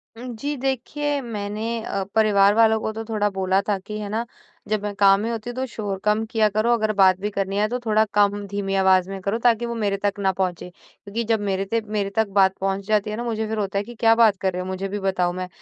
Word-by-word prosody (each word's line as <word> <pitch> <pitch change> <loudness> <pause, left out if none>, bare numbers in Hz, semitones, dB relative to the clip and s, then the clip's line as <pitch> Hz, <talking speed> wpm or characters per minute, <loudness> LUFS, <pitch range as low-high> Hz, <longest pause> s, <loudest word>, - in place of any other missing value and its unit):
हुँ, 240 +3 -9
जी। 285 +6 -3
देखिए, 275 +3 -2
मैंने 220 0 -4
अ, 195 -2 -2
परिवार 205 -2 +5
वालों 220 0 +4
को 220 - -2
तो 225 +1 -5
थोड़ा 215 -2 0
बोला 190 0 +1
था 205 - +2
कि 210 +3 -7
है 205 -1 -5
ना 225 +3 -2 0.4
जब 215 -1 -1
मैं 205 0 -3
काम 195 -1 +6
में 225 - -2
होती 230 0 -5
हूँ 240 - -6
तो 260 +1 -2
शोर 205 -5 -5
कम 210 +1 +2
किया 220 -2 +3
करो। 215 +3 +1
अगर 215 -2 +1
बात 190 -2 +4
भी 205 +2 -2
करनी 195 0 -2
है 210 +1 +2
तो 245 - -1
थोड़ा 215 0 +3
कम 205 0 +2
धीमी 195 -1 -3
आवाज़ 190 -1 +3
में 195 0 -5
करो 200 +4 -1
ताकि 235 -1 +2
वो 235 0 -4
मेरे 205 -3 -1
तक 200 0 0
ना 195 -1 +2
पहुँचे। 180 -2 -3
क्योंकि 200 +4 -7
जब 225 -1 +1
मेरे 195 -1 -1
ते 230 +4 0
मेरे 210 -2 -2
तक 220 -1 +2
बात 190 -1 +4
पहुँच 195 0 -1
जाती 215 -1 +1
है 210 - -3
ना 240 - -3
मुझे 220 -2 -2
फिर 220 +1 -3
होता 200 -1 -2
है 200 - 0
कि 240 +3 -11
क्या 225 -1 +5
बात 225 -4 +4
कर 190 -1 0
रहे 180 - -3
हो? - - -5
मुझे 190 +1 -3
भी 205 +1 -4
बताओ। 185 -2 0
मैं 185 0 -4
205 Hz, 265 wpm, -23 LUFS, 195-225 Hz, 0.4 s, काम